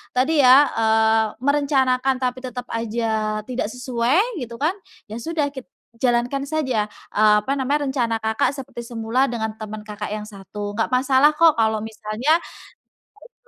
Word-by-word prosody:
tadi 285 +4 +3
ya, 265 +3 +7
eee, 220 0 +3
merencanakan 270 -1 +2
tapi 255 0 -2
tetap 250 -1 -6
aja 220 -2 -1
tidak 250 -4 -2
sesuai 250 +4 0 0.2
gitu 235 -1 -8
kan, 315 +6 +1 0.3
ya 215 - -8
sudah 310 +2 -1
kita 265 -3 -10 0.4
jalankan 245 +2 +1
saja, 260 -9 -1 0.3
eee, 210 0 +5
apa 265 - -3
namanya 280 +2 0
rencana, 240 -4 0
Kakak, 220 +2 0
seperti 255 -3 -8
semula 235 +3 0
dengan 220 -2 -3
teman, 215 0 -7
Kakak, 210 0 -6
yang 210 0 -5
1, 205 0 -7
nggak 225 +3 -1
masalah 265 +3 +4
kok 330 -1 +5
kalau 220 -1 +1
misalnya 220 +5 -2
teman, 345 - -6 0.7
Kakak, 485 - -20
240 Hz, 155 wpm, -22 LUFS, 220-270 Hz, 0.7 s, ya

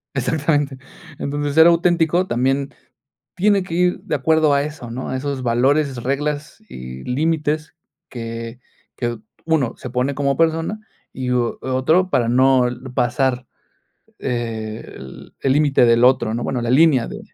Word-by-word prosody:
Exactamente. 145 -3 0 0.4
Entonces, 145 0 -2
ser 160 +2 +7
auténtico 170 0 +3
también, 135 -1 -1 0.6
tiene 200 +2 +3
que 180 - -8
ir 180 0 +1
de - - -2
acuerdo 160 -2 +3
a 140 - +2
eso, 145 -5 -7
¿no?, 130 +3 -5
a 130 - -2
esos 135 -1 -4
valores, 130 +2 +1
reglas 150 - -3
y 65 +1 -8
límites 155 +3 -1 0.3
que 115 0 -7 0.4
que 120 -2 -3 0.3
uno 160 -7 +1
se 130 - -7
pone 125 +3 -1
como 140 -1 0
persona, 165 +5 0 0.3
y, 125 -1 -3
o 120 -1 0
otro 145 +8 +1
para 120 -8 +1
no 130 +1 +4
l 125 +2 -8
pasar, 125 +1 0 0.8
eh, 115 -3 -4
el 65 0 -12
el 135 - +2
límite 145 -2 +3
del 115 +1 +4
otro, 125 -3 +3
¿no?, 120 +1 -3
bueno, 125 -3 -2
la 120 - -1
línea 135 -3 +4
de - - -7
135 Hz, 150 wpm, -20 LUFS, 125-155 Hz, 0.8 s, ser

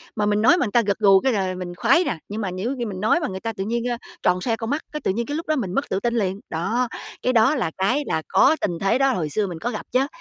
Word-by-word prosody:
mà 210 -1 0
mình 210 0 +1
nói 335 +10 +6
mà - - +1
người 205 - -4
ta 240 - +5
gật 200 -2 -1
gù 195 -2 +6
cái 265 +2 +1
là 190 -2 0
mình 175 -1 -6
khoái 270 - +4
nè, 235 - -2
nhưng 215 +2 -4
mà 190 -3 -2
nếu 220 +9 -3
khi 240 - -1
mình 190 -3 -5
nói 220 +11 +3
mà 300 - -2
người 190 0 -5
ta 225 +1 -4
tự 195 - -4
nhiên, 235 +2 -1
ơ, 240 - -1 0.3
tròn 180 0 +2
xoe 230 +1 0
con 225 0 -5
mắt, 290 +3 -1
cái, 300 - -4
tự - - +1
nhiên 235 +4 -2
cái 290 - -4
lúc 330 - -6
đó 310 - +2
mình 190 -9 -2
mất 275 - -1
tự 190 - 0
tin 235 +2 -1
liền. 195 -3 -1
Đó, 230 +10 -1 0.3
cái 255 - +1
đó 235 +6 +4
là 195 - -1
cái 250 +10 +1
là 160 - 0
có 320 - +4
tình 175 -4 -1
thế 195 +6 +2
đó 270 0 +3
hồi 155 -7 -2
xưa 205 +4 0
mình 170 -3 -6
có 240 +2 -2
gặp 215 - -6
chứ, 265 +2 +2
220 Hz, 330 wpm, -23 LUFS, 190-250 Hz, 0.3 s, nói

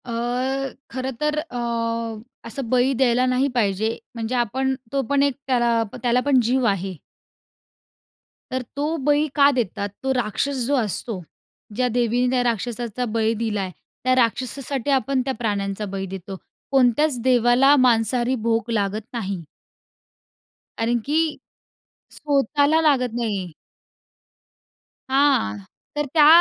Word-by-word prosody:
अ, 245 - -6 0.8
खरं 260 0 -3
तर 300 0 +1
अ, 305 -5 -8 0.9
असं 230 +1 -5
बळी 255 +2 +3
द्यायला 250 -1 +3
नाही 255 +2 +2
पाहिजे, 220 0 +1 0.2
म्हणजे 230 +2 -3
आपण 260 +3 0 0.2
तो 275 - +2
पण 280 0 +3
एक 280 -2 +1
त्याला 240 -3 +2
प - - -7
त्याला 245 0 +3
पण 280 -3 +4
जीव 250 +2 +1
आहे. 195 -1 -1 1.6
तर 260 0 -1
तो 285 +1 -1 0.2
बळी 295 +1 +3
का 285 -1 +6
देतात? 210 -5 -2
तो 265 0 +1
राक्षस 250 +2 -1
जो 285 - +2
असतो, 220 -3 -2 0.5
ज्या 250 +2 +1
देवीने 245 +1 +1
त्या 250 -1 +2
राक्षसाचा 240 0 -2
बळी 225 0 +2
दिला 220 -2 -2
आहे, 190 -1 -4 0.3
त्या 255 +1 +3
राक्षसासाठी 255 +3 0
आपण 270 0 +1
त्या 265 - -1
प्राण्यांचा 205 -2 -2
बळी 195 -1 -3
देतो. 190 +1 -7 0.4
कोणत्याच 265 +1 +3
देवाला 250 +3 +5
मांसाहारी 245 -1 +3
भोग 230 0 +1
लागत 210 -1 0
नाही 195 -7 -3 1.3
कारण 235 +1 +1
की 295 +2 +1 1.0
स्वतःला 290 +2 +2
लागत 255 -6 +2
नाही. 200 -6 -2 1.6
हां, 265 - +3 0.4
तर 295 0 0
त्या 300 -3 +7
245 Hz, 130 wpm, -23 LUFS, 225-270 Hz, 1.6 s, त्या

